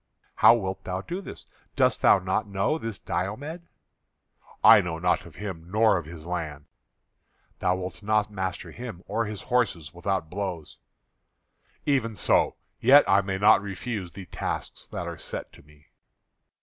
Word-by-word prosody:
"How 115 Hz, +2 st, +8 dB
wilt 95 Hz, -3 st, -4 dB
thou 95 Hz, 0 st, -3 dB
do 175 Hz, -, -5 dB
this? -, -, -9 dB, 0.3 s
Dost -, -, +2 dB
thou -, -, +7 dB
not 95 Hz, +3 st, -1 dB
know 100 Hz, +11 st, 0 dB
this 115 Hz, -6 st, -4 dB
Diomed?" 145 Hz, -, -4 dB, 1.0 s
"I -, -, +9 dB
know 85 Hz, -2 st, -4 dB
naught 90 Hz, +1 st, 0 dB
of 85 Hz, -, -15 dB
him, 90 Hz, -5 st, -7 dB
nor 110 Hz, +1 st, +4 dB
of 80 Hz, -, -10 dB
his 80 Hz, -1 st, -10 dB
land." 80 Hz, -5 st, -4 dB, 0.9 s
"Thou 90 Hz, 0 st, +2 dB
wilt 90 Hz, +2 st, -6 dB
not 105 Hz, 0 st, +1 dB
master 95 Hz, -2 st, -4 dB
him 115 Hz, -7 st, -8 dB
or 115 Hz, 0 st, 0 dB
his 105 Hz, -1 st, -6 dB
horses 110 Hz, -, 0 dB
without 90 Hz, -1 st, -2 dB
blows." 90 Hz, -3 st, -5 dB, 1.1 s
"Even 120 Hz, -6 st, +1 dB
so, -, -, +2 dB, 0.2 s
yet 140 Hz, +5 st, +7 dB
I 95 Hz, +1 st, +5 dB
may 95 Hz, -1 st, -3 dB
not 105 Hz, +1 st, +6 dB
refuse 100 Hz, -1 st, -5 dB
the 95 Hz, -, -9 dB
tasks -, -, -5 dB
that -, -, -5 dB
are -, -, -6 dB
set -, -, -7 dB
to -, -, -16 dB
me." 75 Hz, 0 st, -23 dB
95 Hz, 160 wpm, -26 LUFS, 90-110 Hz, 1.1 s, I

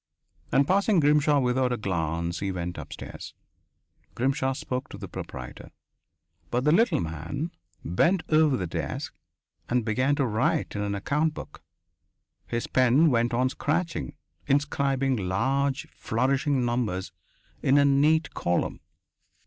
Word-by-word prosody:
And 140 Hz, -, +4 dB
passing 200 Hz, 0 st, +3 dB
Grimshaw 150 Hz, 0 st, +4 dB
without 125 Hz, 0 st, +1 dB
a 125 Hz, -, 0 dB
glance 85 Hz, -3 st, -2 dB
he 100 Hz, -1 st, -2 dB
went 90 Hz, -1 st, -4 dB
upstairs. -, -, -9 dB, 0.8 s
Grimshaw 135 Hz, +1 st, 0 dB
spoke 130 Hz, -1 st, -4 dB
to -, -, -8 dB
the -, -, -7 dB
proprietor. 65 Hz, -1 st, -8 dB, 0.8 s
But 125 Hz, +1 st, 0 dB
the 150 Hz, -, +4 dB
little 230 Hz, +9 st, +4 dB
man 85 Hz, -, -4 dB, 0.3 s
bent 165 Hz, -, +2 dB
over 155 Hz, -3 st, +4 dB
the 90 Hz, -, -2 dB
desk, 85 Hz, -, -4 dB, 0.6 s
and 120 Hz, -2 st, +1 dB
began 130 Hz, +6 st, +1 dB
to 140 Hz, -, +1 dB
write 110 Hz, 0 st, 0 dB
in 100 Hz, -, -2 dB
an 100 Hz, -1 st, -1 dB
account 150 Hz, +10 st, 0 dB
book. -, -, -9 dB, 0.9 s
His 120 Hz, 0 st, -2 dB
pen 130 Hz, +5 st, +4 dB
went 120 Hz, -1 st, +2 dB
on 125 Hz, +2 st, +2 dB
scratching, 165 Hz, +6 st, -2 dB, 0.3 s
inscribing 135 Hz, -2 st, +1 dB
large, 135 Hz, +10 st, 0 dB
flourishing 135 Hz, +2 st, 0 dB
numbers 110 Hz, -7 st, -1 dB, 0.5 s
in 135 Hz, +2 st, +4 dB
a 140 Hz, -, +5 dB
neat 145 Hz, +2 st, +3 dB
column.... 85 Hz, 0 st, -1 dB
130 Hz, 135 wpm, -26 LUFS, 105-145 Hz, 0.9 s, a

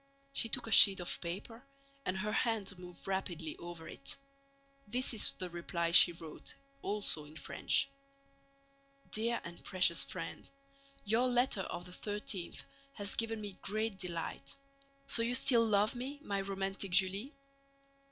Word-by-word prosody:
She 230 Hz, -, -1 dB
took 250 Hz, +1 st, -1 dB
a 225 Hz, -, -5 dB
sheet 195 Hz, -2 st, +9 dB
of 175 Hz, -, -4 dB
paper 205 Hz, +8 st, -6 dB, 0.4 s
and 185 Hz, +1 st, 0 dB
her 210 Hz, +3 st, -2 dB
hand 210 Hz, -5 st, -1 dB
moved 180 Hz, -1 st, -11 dB
rapidly 175 Hz, -5 st, -3 dB
over 170 Hz, -1 st, -9 dB
it. 140 Hz, -, -6 dB, 0.7 s
This 250 Hz, +4 st, +1 dB
is 220 Hz, -, +4 dB
the 185 Hz, -, -5 dB
reply 170 Hz, 0 st, -2 dB
she 175 Hz, -, +9 dB
wrote, 165 Hz, -2 st, -9 dB, 0.3 s
also 200 Hz, -7 st, -1 dB
in 150 Hz, +1 st, -14 dB
French: -, -, 0 dB, 1.2 s
Dear 230 Hz, +2 st, +1 dB
and 170 Hz, 0 st, -9 dB
precious 185 Hz, -2 st, +4 dB
Friend, -, -, -6 dB, 0.6 s
Your 225 Hz, +5 st, +3 dB
letter 245 Hz, -4 st, +2 dB
of 175 Hz, -1 st, -6 dB
the 180 Hz, -, -10 dB
13th 205 Hz, -2 st, -5 dB, 0.3 s
has 205 Hz, -1 st, -1 dB
given 225 Hz, -1 st, -1 dB
me 205 Hz, -2 st, -7 dB
great 215 Hz, -1 st, -2 dB
delight. 170 Hz, -3 st, -5 dB, 0.5 s
So 255 Hz, -4 st, +5 dB
you 235 Hz, +2 st, +2 dB
still 240 Hz, -2 st, +4 dB
love 210 Hz, 0 st, +3 dB
me, 265 Hz, +4 st, -5 dB
my 200 Hz, -5 st, -1 dB
romantic 195 Hz, 0 st, -2 dB
Julie? 195 Hz, +9 st, +1 dB
200 Hz, 145 wpm, -34 LUFS, 180-225 Hz, 1.2 s, sheet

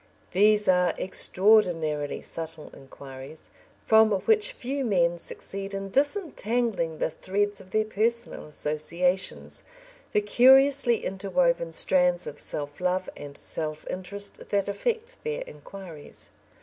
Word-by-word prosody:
These 210 Hz, +2 st, +4 dB
are 180 Hz, -1 st, +3 dB
extraordinarily 180 Hz, -7 st, +2 dB
subtle 160 Hz, -1 st, -5 dB
inquiries, 135 Hz, +2 st, -11 dB, 0.3 s
from 220 Hz, 0 st, +6 dB
which 430 Hz, -, +2 dB
few 275 Hz, -, -4 dB
men 175 Hz, -6 st, +1 dB
succeed 195 Hz, +3 st, -5 dB
in 195 Hz, 0 st, -5 dB
disentangling 240 Hz, -, -1 dB
the -, -, -1 dB
threads 205 Hz, +4 st, -2 dB
of 185 Hz, -, -16 dB
their 215 Hz, +2 st, +1 dB
personal 225 Hz, -2 st, -2 dB
associations 170 Hz, +5 st, -2 dB, 0.5 s
the 210 Hz, -, +2 dB
curiously 260 Hz, +2 st, +5 dB
interwoven 195 Hz, 0 st, 0 dB
strands 180 Hz, +1 st, +2 dB
of 145 Hz, -, -7 dB
self 145 Hz, +2 st, -3 dB
love 180 Hz, +1 st, -1 dB
and 145 Hz, -1 st, -10 dB
self 155 Hz, -1 st, -1 dB
interest 200 Hz, +2 st, -5 dB
that 200 Hz, -1 st, 0 dB
affect 465 Hz, -, -3 dB
their 460 Hz, +2 st, -3 dB
inquiries. 190 Hz, -, -12 dB
195 Hz, 115 wpm, -26 LUFS, 165-230 Hz, 0.5 s, from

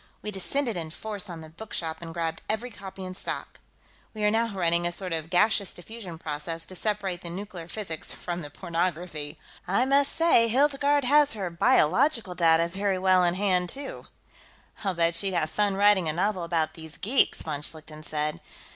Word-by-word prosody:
We 210 Hz, -, -3 dB
descended 230 Hz, +5 st, -1 dB
in 165 Hz, -2 st, -4 dB
force 205 Hz, +3 st, -5 dB
on 170 Hz, -2 st, -7 dB
the 160 Hz, -, -10 dB
bookshop 165 Hz, -3 st, -5 dB
and 165 Hz, -1 st, -6 dB
grabbed 165 Hz, -1 st, -3 dB
every 230 Hz, +3 st, -1 dB
copy 195 Hz, -2 st, -8 dB
in 185 Hz, -, -5 dB
stock. -, -, -4 dB, 0.6 s
We 215 Hz, -, -3 dB
are 210 Hz, -, +4 dB
now 230 Hz, +1 st, +2 dB
running 175 Hz, -4 st, +1 dB
a -, -, -2 dB
sort 180 Hz, 0 st, -3 dB
of 160 Hz, 0 st, -2 dB
gaseous 200 Hz, +2 st, +3 dB
diffusion 185 Hz, -2 st, -8 dB
process, 160 Hz, +1 st, -4 dB
to 185 Hz, -, -8 dB
separate 195 Hz, -3 st, -1 dB
the 175 Hz, -, -6 dB
nuclear 180 Hz, -2 st, -7 dB
physics 175 Hz, -4 st, -4 dB
from 175 Hz, 0 st, -4 dB
the 145 Hz, -, -7 dB
pornography. 170 Hz, -2 st, -3 dB, 0.3 s
I 200 Hz, +7 st, +3 dB
must 275 Hz, +1 st, +3 dB
say, 325 Hz, -9 st, +5 dB
Hildegarde 280 Hz, +3 st, +3 dB
has 290 Hz, +2 st, +5 dB
her 195 Hz, -5 st, -3 dB
biological 195 Hz, -, +3 dB
data 165 Hz, -1 st, +4 dB
very 195 Hz, +2 st, -1 dB
well 185 Hz, -1 st, +4 dB
in 175 Hz, 0 st, +3 dB
hand, 185 Hz, -2 st, +1 dB
too." 275 Hz, +5 st, -6 dB, 0.8 s
"I'll 195 Hz, -3 st, 0 dB
bet 170 Hz, 0 st, +2 dB
she'd 190 Hz, +2 st, 0 dB
have 155 Hz, -2 st, 0 dB
fun 205 Hz, -2 st, +1 dB
writing 200 Hz, -4 st, +4 dB
a -, -, 0 dB
novel 185 Hz, +1 st, 0 dB
about 165 Hz, -2 st, 0 dB
these 160 Hz, -1 st, -9 dB
geeks," 240 Hz, +8 st, +3 dB
von 150 Hz, -3 st, -3 dB
Schlichten 155 Hz, 0 st, -6 dB
said. 150 Hz, 0 st, -2 dB
185 Hz, 185 wpm, -27 LUFS, 165-210 Hz, 0.8 s, say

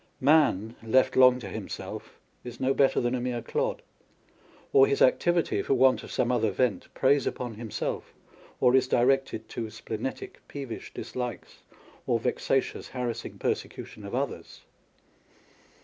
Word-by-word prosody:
Man, 130 Hz, -7 st, +3 dB
left 115 Hz, +4 st, +2 dB
long 125 Hz, -1 st, +7 dB
to -, -, -6 dB
himself, -, -, -7 dB, 0.3 s
is 120 Hz, -1 st, -9 dB
no 130 Hz, +1 st, +2 dB
better 135 Hz, -1 st, +3 dB
than 120 Hz, 0 st, 0 dB
a 125 Hz, -, -1 dB
mere 120 Hz, -1 st, -2 dB
clod; -, -, -2 dB, 0.9 s
or 420 Hz, 0 st, +7 dB
his 420 Hz, 0 st, 0 dB
activity, 175 Hz, -, +3 dB
for 135 Hz, -, +1 dB
want 130 Hz, 0 st, +4 dB
of -, -, -10 dB
some 125 Hz, -, +1 dB
other 115 Hz, -3 st, +2 dB
vent, 105 Hz, -1 st, -1 dB
preys 135 Hz, 0 st, +3 dB
upon 125 Hz, -2 st, -3 dB
himself, 110 Hz, 0 st, -4 dB, 0.5 s
or 125 Hz, -1 st, +4 dB
is 130 Hz, -1 st, +4 dB
directed 130 Hz, -2 st, +1 dB
to 115 Hz, -2 st, -4 dB
splenetic, 110 Hz, +2 st, -6 dB
peevish 135 Hz, -5 st, -7 dB
dislikes, 125 Hz, -5 st, -6 dB, 0.5 s
or -, -, +3 dB
vexatious, -, -, -1 dB
harassing 125 Hz, -3 st, -4 dB
persecution -, -, -4 dB
of -, -, -5 dB
others. -, -, -4 dB
125 Hz, 140 wpm, -28 LUFS, 120-135 Hz, 0.9 s, long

